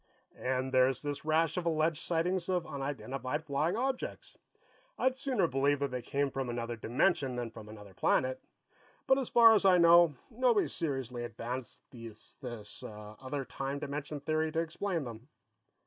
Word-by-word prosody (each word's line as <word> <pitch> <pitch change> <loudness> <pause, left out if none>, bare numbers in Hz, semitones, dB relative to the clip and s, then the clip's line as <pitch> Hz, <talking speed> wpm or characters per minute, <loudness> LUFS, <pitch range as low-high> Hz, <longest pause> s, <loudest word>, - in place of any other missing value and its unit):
"And 130 +1 -1
there's 130 +1 +3
this 145 0 -4
rash 160 +1 +2
of 175 -1 -1
alleged 160 -1 +1
sightings 175 +2 0
of 180 -2 0
unidentified 135 +1 -4
flying 155 +7 0
objects. 265 +1 -3 0.6
I'd 260 0 +2
sooner 260 -8 +1
believe 140 -1 +2
that 140 -1 -2
they 125 -1 -3
came 140 +3 -1
from 130 -1 -3
another 120 0 -3
dimension 130 +4 +1
than 120 -2 -4
from 110 -2 -11
another 105 -2 -11
planet. 130 +7 +1 0.6
But, 265 +1 +4
as 260 - -3
far 230 -1 +8
as 215 - +3
I 190 -2 +6
know, 170 -2 +6 0.2
nobody's 240 -2 +2
seriously 135 -7 -3
advanced 120 +2 -6
this 115 -1 -9
other 110 +6 -6
time 135 +2 -4
dimension 145 +1 -4
theory 155 +1 0
to 165 - +1
explain 165 +1 -2
them." 120 0 -9
140 Hz, 155 wpm, -32 LUFS, 125-170 Hz, 0.6 s, far